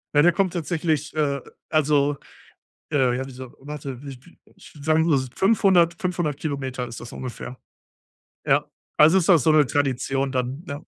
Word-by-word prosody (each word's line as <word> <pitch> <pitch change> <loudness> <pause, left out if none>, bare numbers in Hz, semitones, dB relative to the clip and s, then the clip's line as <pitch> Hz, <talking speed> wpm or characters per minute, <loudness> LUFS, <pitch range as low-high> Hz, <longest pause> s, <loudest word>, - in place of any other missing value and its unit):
Ja, 145 - +6
der 175 - +6
kommt 185 0 0
tatsächlich, 160 -3 -1
äh, 145 -3 0 0.3
also 145 -2 +2 0.7
äh, 130 -4 +2
ja, 125 - -2
wieso 130 -1 -10
warte, 140 -2 -7
w 145 - -10
w 170 +8 -20 0.2
ich - - -16
sagen 155 +2 +2
wir 165 - 0
mal 140 - +4
s 130 - -9
500- 190 -5 +4
500 175 -6 -1
Kilometer 135 -4 -4
ist 115 - -8
das 120 - -10
ungefähr. 125 0 -7 0.9
Ja, - - +3 0.3
also, 160 +5 +6
ist 175 - -1
das 165 -8 +6
so 160 - +4
'ne 150 -3 +4
Tradition 135 0 0
dann, 130 +4 -3
ja. 140 +1 -6
145 Hz, 175 wpm, -23 LUFS, 130-160 Hz, 0.9 s, Ja